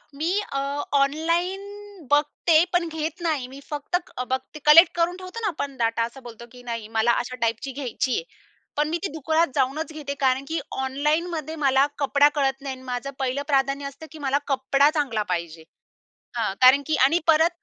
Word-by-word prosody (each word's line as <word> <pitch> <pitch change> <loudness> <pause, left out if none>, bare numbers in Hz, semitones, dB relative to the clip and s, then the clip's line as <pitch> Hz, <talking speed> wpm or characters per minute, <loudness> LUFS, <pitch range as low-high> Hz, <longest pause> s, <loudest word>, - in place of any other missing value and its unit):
मी 315 +5 -1 0.2
अ, 275 - 0 0.4
online 335 +7 0 0.4
बघते 310 +2 +3
पण 350 -1 +2
घेत 320 +1 -4
नाही. 310 -7 -1
मी 265 +2 -11
फक्त 295 +3 -3 0.2
अ, 250 - -1
बघते. 260 +4 -4
कलेक्ट 330 +4 +8
करून 345 +1 0
ठेवतो 370 +4 -8
ना 435 - 0
आपण 285 -6 -4
डाटा 230 -1 +1
असा 235 +4 -6
बोलतो 235 0 -10
की 250 -1 -14
नाही? 230 -3 -5
मला 225 +2 +4
अशा 255 +1 -7
टाइपची 230 +4 -1
घ्यायची 260 -1 -2
आहे. - - -2 0.5
पण 295 0 +2
मी 335 - 0
ती - - +1
दुकानात 320 +2 +1
जाऊनच 290 +4 0
घेते. 295 -2 -5
कारण 265 0 +2
की 325 0 -2
ऑनलाईनमध्ये 305 +4 -1
मला 270 0 +4
कपडा 285 0 +4
कळत 270 -1 0
नाही 270 -1 -4
आणि 260 - -15
माझं 250 +2 -4
पहिलं 265 +1 -1
प्राधान्य 275 0 +1
असतं 280 +3 -10
की 315 - -11
मला 270 +1 +2
कपडा 275 +1 +3
चांगला 260 -9 0
पाहिजे. 170 -2 -5 0.7
हां, 220 -4 0
कारण 260 +2 +7
की 315 - +1
आणि 325 +6 +3
परत 320 +1 +5
280 Hz, 185 wpm, -24 LUFS, 260-315 Hz, 0.7 s, कलेक्ट